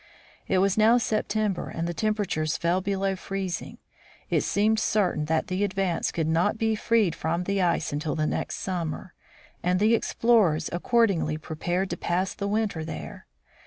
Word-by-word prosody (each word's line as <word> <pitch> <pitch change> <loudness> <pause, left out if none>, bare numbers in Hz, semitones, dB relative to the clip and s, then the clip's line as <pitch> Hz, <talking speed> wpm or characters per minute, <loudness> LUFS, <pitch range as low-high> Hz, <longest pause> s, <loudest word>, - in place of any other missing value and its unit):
It 190 - +2
was 195 +2 +2
now 225 +3 +6
September, 215 -4 -1
and 165 +1 -3
the 175 - -2
temperature 205 -6 -1
fell 170 +3 0
below 195 0 -1
freezing. 190 -1 -4 0.5
It - - +3
seemed 215 +2 +2
certain 185 -10 +1
that 160 +1 0
the 185 +2 -1
Advance 190 -3 0
could 160 -2 -1
not 170 +7 +2
be 220 0 +1
freed 220 -4 +2
from 165 +2 -2
the 200 +1 0
ice 170 -4 +1
until 150 +1 -2
the 155 -1 0
next - - -2
summer, 175 -1 -4 0.5
and 180 +1 +1
the 215 +3 +4
ex 230 - 0
plorers 195 -11 +3
accordingly 190 -6 +2
prepared 175 +4 -2
to - - -3
pass 180 +2 -1
the 200 - -4
winter 205 -6 -1
there. 160 - -7
185 Hz, 165 wpm, -26 LUFS, 170-210 Hz, 0.5 s, now